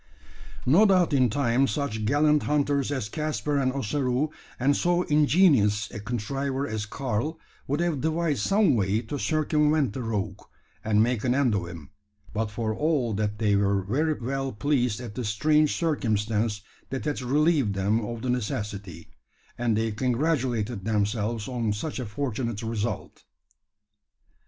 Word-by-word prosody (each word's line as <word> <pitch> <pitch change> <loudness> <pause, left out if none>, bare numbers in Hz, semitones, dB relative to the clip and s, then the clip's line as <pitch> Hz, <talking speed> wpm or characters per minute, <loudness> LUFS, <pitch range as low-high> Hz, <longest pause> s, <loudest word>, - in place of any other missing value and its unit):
No 175 +12 +6
doubt 185 -5 +3
in 130 -3 +4
time 130 +2 +2
such 130 -8 -2
gallant 150 +4 +3
hunters 145 -1 +1
as 130 -7 -2
Caspar 150 +2 -1
and 130 -1 +1
Ossaroo, 135 +3 -1 0.3
and 140 +3 +3
so 175 +3 +2
ingenious 145 - +3
a 115 - -6
contriver 135 +5 -2
as 110 -2 -3
Karl, 135 +6 -2 0.3
would 145 +3 0
have 170 -6 0
devised 160 -5 0
some 195 - +3
way 105 +1 +1
to 140 +5 -5
circumvent 150 -4 +1
the 130 - -4
rogue, 105 -4 -3 0.4
and 110 0 +3
make 120 -2 0
an 125 0 +2
end 135 -5 +2
of 95 -4 -1
him; 85 -5 -10 0.4
but 110 0 -1
for 110 +1 -2
all 140 -4 0
that 105 0 -1
they 105 -2 +2
were 100 -1 +2
very 150 +11 +1
well 135 +2 -2
pleased 125 -2 0
at 120 -4 -7
the 125 - -4
strange 150 +8 +2
circumstance 110 -8 0 0.3
that 135 +2 -4
had 150 -3 -2
relieved 140 -4 +2
them 105 +4 +1
of 115 +1 -5
the 130 - -2
necessity, 105 -6 -4 0.4
and 120 -3 0
they 110 0 0
congratulated 120 - -1
themselves 105 +1 -1
on 120 -4 -1
such 125 +9 -4
a 125 - -4
fortunate 115 -2 -3
result. 110 -2 -4
125 Hz, 150 wpm, -26 LUFS, 105-145 Hz, 0.4 s, No